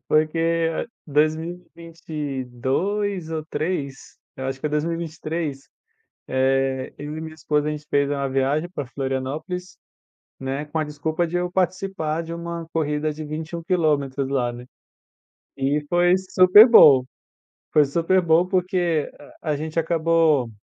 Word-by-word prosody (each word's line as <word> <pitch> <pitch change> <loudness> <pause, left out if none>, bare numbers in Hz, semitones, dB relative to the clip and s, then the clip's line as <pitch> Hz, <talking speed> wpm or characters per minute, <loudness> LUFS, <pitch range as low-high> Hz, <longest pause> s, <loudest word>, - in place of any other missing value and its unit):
Porque 165 +1 +2 0.4
2022 160 - -2
ou 155 -1 -3
3, 145 -3 -4 0.2
eu 130 0 -4
acho 135 0 -4
que - - -2
é - - 0
2023, 155 -1 -3 0.6
eh, 130 0 0
eu 150 +1 -6
e - - -5
minha 160 0 -7
esposa, 150 -1 -1
a - - 0
gente 150 0 -6
fez 140 0 +1
uma 140 -1 -1
viagem 135 +5 0
pra 145 - -4
Florianópolis, 140 +8 -4 0.6
né, 135 +2 -3
com 160 +2 -3
a 155 - +1
desculpa 155 +3 -2
de 175 +2 -3
eu 175 0 -1
participar 180 -3 -1
de 165 0 -6
uma 170 -1 -5
corrida 150 -1 -1
de 155 +1 -7
21 160 +3 -5
quilômetros 145 -6 0
lá, 125 -3 0
né, 120 +1 -9 0.9
e 140 +2 0
foi 175 +1 +4
super 190 +3 +7
bom, 140 - +8 0.7
foi 150 -1 +6
super 170 +6 +2
bom 170 0 +3
porque 180 -4 0 0.3
a 155 -2 -1
gente 155 +2 -3
acabou, 165 -5 +2
155 Hz, 135 wpm, -23 LUFS, 140-170 Hz, 0.9 s, bom